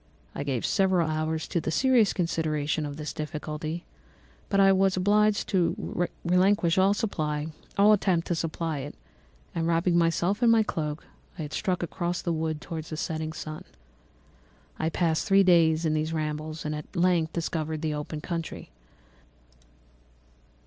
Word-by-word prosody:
I - - -5
gave 135 -5 -2
several 190 -4 +2
hours 155 0 -2
to 170 - 0
the - - -3
serious 240 +3 +4
consideration 155 -3 -1
of 145 0 -7
this 150 -1 -5
difficulty, 155 +1 -5 0.6
but 195 - +2
I 195 0 +7
was 190 0 +3
obliged 210 +2 +3
to 175 -1 0 0.2
relinquish 180 0 +3
all 190 +1 +5 1.0
attempt 185 -5 +1
to - - -1
supply 165 -2 -2
it, 140 +2 -7 0.6
and 165 -1 -1
wrapping 170 +1 +2
myself 170 +4 +2
up - - -2
in - - +6
my 225 -1 +5
cloak, 155 -6 -4 0.3
I 155 -4 -4
struck 180 +3 -1
across 175 +1 -3
the 170 - 0
wood 160 -1 -2
towards 160 -1 -6
the 155 - -5
setting 160 -1 -3
sun. 155 -1 -7 1.2
I 160 - +1
passed 165 +2 0
three 195 -1 +6
days 165 -3 +4
in 155 - +2
these 155 +1 -1
rambles 155 0 -3
and 150 - -1
at 150 +5 -8
length 175 -2 +2
discovered 160 -2 -3
the 155 -1 0
open 150 +1 -5
country. 165 - -5
165 Hz, 150 wpm, -27 LUFS, 155-180 Hz, 1.2 s, I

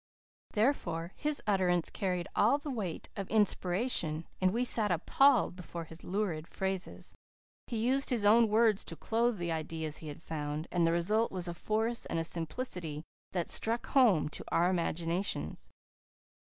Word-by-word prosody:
Therefore, 210 - 0
his 300 -1 +1
utterances 185 -4 +1
carried 180 -4 -2
all 235 +7 +4
the 290 0 -6
weight 200 -10 -4
of 195 -2 -5
inspiration, 185 -5 +1 0.2
and 185 - +4
we 240 +4 0
sat 220 -3 +2
appalled 190 - +3
before 175 -2 -7
his 165 +1 -9
lurid 180 -5 -2
phrases. 190 -1 -3 0.5
He 235 - -3
used 260 +5 +2
his 235 -5 0
own 225 +2 +6
words 220 -1 +3
to - - -5
clothe 230 0 0
the 175 -1 -2
ideas 160 -1 -3
he 160 - -8
had 150 +2 -8
found, 150 +1 -4
and 170 -2 +2
the - - +3
result 210 +7 +1
was 180 -2 -4
a 175 - -3
force 220 +6 -1
and 165 0 -1
simplicity 165 - -3 0.3
that 175 -2 -1
struck 230 +2 +1
home 235 - +4
to - - -6
our 175 +2 +2
imaginations. 170 +1 -2
185 Hz, 155 wpm, -32 LUFS, 165-225 Hz, 0.5 s, own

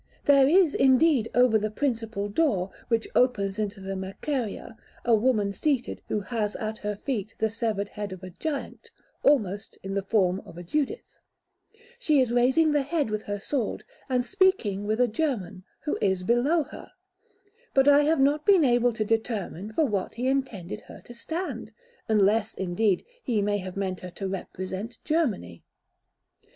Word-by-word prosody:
There 275 -2 +6
is, 340 0 +5
indeed, 265 -2 +4
over 245 -3 +5
the 215 +1 -1
principal 225 -4 -2
door, 205 - +1 0.2
which 230 -1 0
opens 205 -5 +2
into 205 -1 -2
the 195 0 -5
Merceria, 215 +5 -4 0.3
a 240 - +4
woman 215 -3 +2
seated 275 +1 -1
who 210 - -1
has 210 -1 -2
at 215 0 -4
her 210 0 -3
feet 225 -2 -4
the 220 -1 0
severed 220 -3 -2
head 205 -2 -6
of 185 -1 -9
a 185 - -8
giant, 285 - -5 0.3
almost 215 -7 +1
in 195 0 -4
the 200 - 0
form 190 -2 +1
of 165 - -13
a 175 - -7
Judith; 300 - -3 0.8
she 310 - +3
is 255 -3 +2
raising 260 +6 +4
the 295 -1 +3
head 285 -4 -1
with 215 0 -1
her 205 0 -3
sword, 235 +3 -2 0.3
and 250 -1 +1
speaking 235 - +1
with 215 +2 0
a 250 - +4
German, 215 - -2 0.2
who 300 - -2
is 190 -2 +1
below 255 - +2
her; - - -12 0.8
but 270 0 +5
I 285 0 +7
have 320 0 +2
not 290 +2 +3
been 375 -5 +5
able 240 -1 +3
to 220 -1 -2
determine 215 -3 -2
for 310 +8 +2
what 205 -7 -2
he 245 +3 -2
intended 260 -10 -2
her - - -11
to 240 - -12
stand, 330 +10 -5 0.4
unless, 215 +1 +3
indeed, 190 +1 0 0.2
he 235 - 0
may 205 0 0
have 185 0 -7
meant 190 -2 -2
her 180 - -8
to 190 +2 -5
represent 190 +4 -5
Germany. 235 - -1
225 Hz, 170 wpm, -26 LUFS, 200-270 Hz, 0.8 s, I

